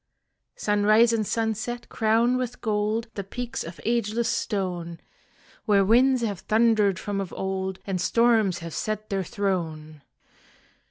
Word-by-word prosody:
Sunrise 215 +3 +3
and 215 -3 0
sunset 230 +2 -2
crown 230 +3 +2
with 250 -1 -3
gold 215 +1 -1
The 200 - -4
peaks 240 +5 -5
of 165 -2 -9
ageless 235 0 0
stone, 180 -5 -2 0.7
Where 200 -3 +4
winds 250 +4 +4
have 205 -5 -2
thundered 215 -3 +2
from 200 +1 -3
of 190 - -6
old 190 0 -3
And 190 -3 -2
storms 225 -4 +3
have 165 - -7
set 215 0 -4
their 195 -1 0
throne. 160 -6 -3
210 Hz, 130 wpm, -25 LUFS, 190-230 Hz, 0.7 s, Where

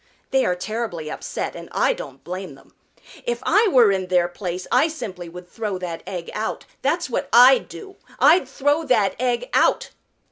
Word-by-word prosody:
They 265 -1 +3
are 180 - +1
terribly 180 -5 -4
upset, - - -5
and - - -9
I - - +2
don't - - -10
blame 180 -4 -6
them. 135 - -21 0.5
If 240 0 -1
I 420 +5 +4
were 245 - +5
in 190 -1 -1
their 180 -1 +2
place 180 0 -5
I 315 - +4
simply 190 - -7
would 180 +1 -11
throw 210 0 -4
that 175 -2 -5
egg 175 -3 -6
out. 215 +1 -4 0.2
That's 320 +5 0
what 245 - -3
I'd 255 +2 +7
do, 390 -2 -11 0.2
I'd 335 +5 +5
throw 290 +3 0
that 215 -8 +2
egg 250 - 0
out!" - - +2
215 Hz, 180 wpm, -22 LUFS, 180-275 Hz, 0.5 s, I'd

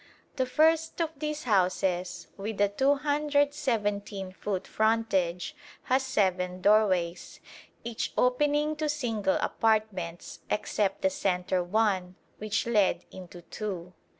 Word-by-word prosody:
The 260 -1 +1
first 320 +4 +2
of 330 -2 0
these 300 0 -3
houses, 185 -4 0
with 205 +1 -5
a 205 0 +4
217 270 -7 0
foot 190 0 -4
frontage, 220 - 0 0.3
has 260 +1 +2
seven 185 -8 0
doorways, 185 -4 +2 0.4
each 230 -1 -3
opening 295 +4 +2
to 305 -1 -1
single 225 -9 0
apartments, 210 -6 -1
except 205 0 -1
the 285 - +3
centre 185 -8 0
one, 185 -2 0 0.2
which 215 0 -1
led 205 -6 +2
into 180 -1 -11
two. 185 -3 -6
210 Hz, 110 wpm, -28 LUFS, 185-270 Hz, 0.4 s, a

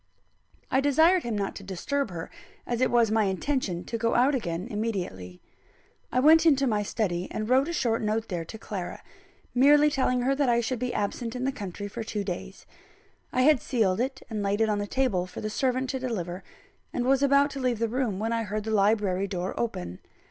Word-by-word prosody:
I 265 - +3
desired 320 +6 +4
him 235 -6 -3
not 200 -1 -2
to 200 - -9
disturb 210 +8 -2
her, 170 -3 -7 0.3
as 240 0 -2
it 255 - +3
was 235 -3 +3
my 220 -1 +3
intention 190 -2 -1
to 230 - -4
go 230 0 +1
out 260 +4 +4
again 180 -6 -2
immediately. 185 - -4 0.7
I 250 - +2
went 315 +4 +6
into 280 -4 +4
my 215 -5 +1
study, 190 -4 -2
and 215 - -4
wrote 260 +4 +3
a - - -2
short 235 -9 0
note 220 +1 -1
there 175 -3 -3
to 195 +7 -9
Clara; 195 -5 -6 0.5
merely 290 +4 +5
telling 255 -3 +1
her 270 +2 +2
that 275 -2 +1
I 235 0 +3
should 235 +1 -2
be 250 0 -2
absent 230 +3 -3
in 250 - -3
the 270 - +1
country 205 -4 -6
for 225 +3 -6
two 210 -1 -3
days. 190 0 -6 0.7
I 255 - +2
had 300 -2 +5
sealed 215 -5 +1 0.3
and 220 -3 -4
laid 200 +1 0
it 220 -1 +3
on 210 -1 0
the 205 - -3
table 205 -8 0
for 180 - -9
the 215 - -4
servant 260 +1 0
to 265 - -3
deliver, 190 -8 -4 0.5
and 245 - -2
was 270 +1 +3
about 280 +1 +4
to 275 - -6
leave 250 -3 0
the 230 +1 0
room, 235 -4 -1
when 225 +3 -1
I 230 - 0
heard 215 0 -3
the 220 - -3
library 200 -2 +2
door 185 -1 -3
open. 90 - -4
225 Hz, 215 wpm, -27 LUFS, 200-260 Hz, 0.7 s, went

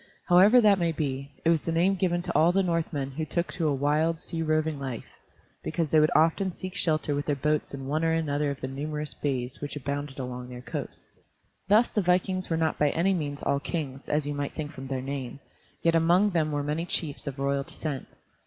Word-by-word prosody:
However 195 +7 +7
that 205 -3 +5
may 170 -1 +1
be, 140 -3 -3
it 165 - +5
was 160 -3 +2
the 165 - -3
name 175 +4 +3
given 175 -2 0
to - - -3
all 165 +2 +5
the 195 +2 +2
Northmen 165 -6 -1
who 155 +4 -3
took 170 +3 -2
to 165 -3 0
a 145 - +2
wild, 155 +4 +1
sea 165 -1 -3
roving 155 -1 0
life, 130 -4 -5 0.6
because 165 -1 -1
they 155 - +5
would 155 0 +5
often 165 +5 +3
seek 185 +1 -7
shelter 155 -2 0
with 145 0 -2
their 145 - +2
boats 150 +2 0
in 135 -1 -7
one 155 +4 -1
or 165 - +3
another 150 -3 0
of 140 - -5
the 130 - -2
numerous 150 +2 -4
bays 130 -3 -3
which 145 0 -5
abounded 145 0 -4
along 125 -1 -5
their 125 0 -8
coasts. - - -7 0.5
Thus 215 +5 +4
the 210 - +1
vikings 185 +1 +1
were 165 - +1
not 160 -1 0
by 150 - +4
any 180 +6 +2
means 145 -5 -3
all 140 - +1
kings, 140 -4 -5
as 150 0 +1
you 145 - -2
might 145 -1 -3
think 150 -2 -5
from 135 0 -8
their 130 -1 -3
name; 135 -1 -5 0.4
yet 165 - +4
among 175 +5 +4
them 160 -3 +1
were 145 -1 -1
many 155 +4 -2
chiefs 150 -5 -2
of 140 -1 -4
royal 140 0 0
descent. 140 0 -5
155 Hz, 225 wpm, -27 LUFS, 140-170 Hz, 0.6 s, However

